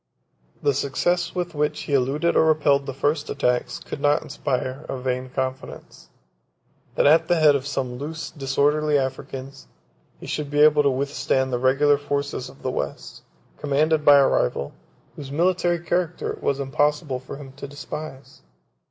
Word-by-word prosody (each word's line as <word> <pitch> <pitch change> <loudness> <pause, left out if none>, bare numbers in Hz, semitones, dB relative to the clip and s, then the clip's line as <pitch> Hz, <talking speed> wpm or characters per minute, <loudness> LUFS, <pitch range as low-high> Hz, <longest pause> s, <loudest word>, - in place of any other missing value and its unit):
The 145 -1 +3
success 175 +7 0
with 175 -1 -3
which 150 0 -1
he 145 - -5
eluded 140 +6 +1
or - - +5
repelled 145 -3 +3
the 135 - -3
first 145 +2 -1
attacks, 125 -3 0
could 140 - -8
not 145 +2 +2
inspire 135 -2 -3
a 135 - -3
vain 130 0 -3
confidence, 130 0 -6 0.9
that - - +2
at 160 +3 +5
the 175 - +3
head 155 -3 +5
of 140 0 -2
some 130 -3 -3
loose, 155 +1 -6
disorderly 145 +2 +1
Africans, 135 0 -5 0.5
he - - -10
should 150 -2 -3
be 145 0 +1
able 150 -1 +6
to 140 - +3
withstand 130 -1 -1
the 120 - 0
regular 140 +3 +3
forces 145 -2 -3
of 135 - -17
the 130 - -1
West, 70 - -5 0.4
commanded 150 +2 +1
by 145 -1 +8
a 140 - +5
rival, 70 +3 0 0.4
whose 140 -2 -8
military 175 +2 +1
character 175 +1 -2
it - - -12
was 140 0 0
impossible 145 0 0
for 130 +1 -9
him 140 -2 -10
to 140 - -7
despise. 145 0 -8
145 Hz, 165 wpm, -23 LUFS, 135-150 Hz, 0.9 s, by